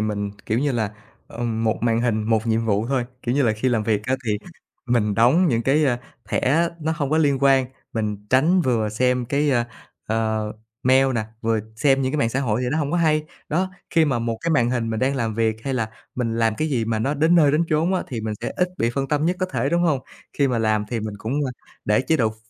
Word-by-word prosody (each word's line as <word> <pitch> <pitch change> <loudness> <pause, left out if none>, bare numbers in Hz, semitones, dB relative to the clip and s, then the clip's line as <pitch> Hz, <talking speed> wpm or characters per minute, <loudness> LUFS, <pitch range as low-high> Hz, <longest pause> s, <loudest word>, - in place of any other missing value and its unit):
mình, 105 -1 -2 0.2
kiểu 110 +2 +1
như 140 0 +1
là, 110 -4 -1 0.4
ờm, 115 -2 -3
một 110 - +1
màn 115 -1 +2
hình, 115 -3 +1
một 110 +1 +1
nhiệm 115 0 +1
vụ 110 0 +1
thôi, 130 -2 0 0.2
kiểu 120 +1 -1
như 140 - +3
là, 115 - +3
khi 110 +4 -1
làm 115 -3 +1
việc 105 -1 0
á 130 - +1
thì 105 -1 0 0.5
mình 110 -4 +1
đóng 135 - +4
những 115 -2 +1
cái, 150 +4 +3
ơ, 125 -3 +2 0.3
thẻ 165 +6 +2
nó 160 +1 0
hông 140 -3 -2
có 155 - +3
liên 140 -3 +3
quan, 135 -2 +4 0.3
mình 105 -2 -3
tránh 160 +8 +4
vừa 115 -7 +1
xem 125 +3 +1
cái, 145 +4 +1
ơ, 120 -3 +2 0.4
ờ, 110 -1 -1 0.3
mail 130 +1 +4
nè, 110 -2 0 0.2
vừa 115 -1 +1 0.2
xem 135 +2 +3
những 130 0 -1
cái 150 - -1
mạng 115 - +2
xã 130 +4 -1
hội 120 -3 0
thì 125 - 0
nó 160 - 0
hổng 145 -2 -1
có 175 - +1
hay. 155 -2 +2 0.2
Đó, 185 +5 0 0.2
khi 165 -1 +4
mà 135 -5 0
một 115 -1 -2
cái 170 - -1
màn 125 -6 +3
hình 115 -2 -1
mình 110 -1 -2
đang 135 +2 +1
làm 115 -3 -1
việc 110 -1 +1
hay 135 -1 -1
là 110 -3 -1 0.2
mình 115 -2 -1
làm 115 -1 +2
cái 155 +7 -1
gì 120 -6 0
mà 110 -1 -1
nó 135 +7 0
đến 160 +4 +3
nơi 155 -4 +5
đến 155 +3 +3
chốn 165 +5 +2
á, - - 0
thì 120 -4 -4
mình 110 -1 -3
sẽ - - -3
ít 180 0 +2
bị 115 - +1
phân 135 -1 -1
tâm 150 +1 +1
nhất 180 +1 +1
có 185 - +1
thể, 135 -4 -1
đúng 170 +2 +1
hông? 150 -6 +2 0.3
Khi 140 -2 +1
mà 120 -2 0
làm 110 -1 +1
thì 120 -2 -1
mình 110 -1 -5
cũng, 115 +4 -4
ơ, 130 - -2 0.3
để 105 0 +3
chế 160 +5 +1
độ 115 -5 +2
ph - - -12
125 Hz, 265 wpm, -22 LUFS, 110-145 Hz, 0.5 s, nơi